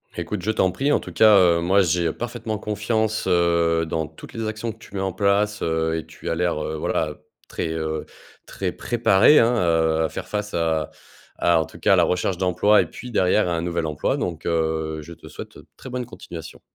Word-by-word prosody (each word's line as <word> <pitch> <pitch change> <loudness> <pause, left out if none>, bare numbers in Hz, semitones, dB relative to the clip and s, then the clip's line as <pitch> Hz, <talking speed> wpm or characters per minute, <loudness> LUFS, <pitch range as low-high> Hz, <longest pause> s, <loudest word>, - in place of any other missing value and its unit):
Écoute, 90 +3 -4
je 105 +5 0
t'en 95 -4 +2
prie, 135 +10 0
en - - +3
tout - - -9
cas, 110 -2 +6
heu, 85 -2 +5
moi, 95 +3 +3
j'ai 85 -2 +1
parfaitement 115 -2 -4
confiance, 110 +1 -1
heu, 85 -2 +2
dans 80 -1 -2
toutes 80 - -13
les 115 -1 -3
actions 110 +1 -3
que 115 - -15
tu 105 -2 -14
mets 95 - -2
en 95 -1 -1
place, 105 +1 +1
heu, 80 0 0
et 80 - -5
tu - - -8
as 85 - 0
l'air, 85 -3 -1
heu, 80 - -3
voilà, 75 0 -1 0.3
très, - - -3
heu 80 -1 -3 0.4
très - - -3
préparée, 115 +3 +4
hein, 115 +1 +4
heu, 80 -4 +2
à 80 - -2
faire - - -7
face 105 0 -4
à 80 -2 0 0.5
à, 85 -2 +3
en - - -3
tout - - -14
cas, - - +3
à - - +7
la - - +4
recherche 90 0 0
d'emploi 95 +3 +4
et - - -3
puis, 125 -1 -9
derrière, 90 0 +2
un 85 -1 -1
nouvel 85 -1 -2
emploi 75 -2 -1
donc 85 -3 -4
heu, 80 -1 -1
je 85 +3 -10
te - - -14
souhaite - - -10 0.2
très - - -10
bonne 125 0 -3
continuation. 85 -8 -10
90 Hz, 220 wpm, -23 LUFS, 80-105 Hz, 0.5 s, à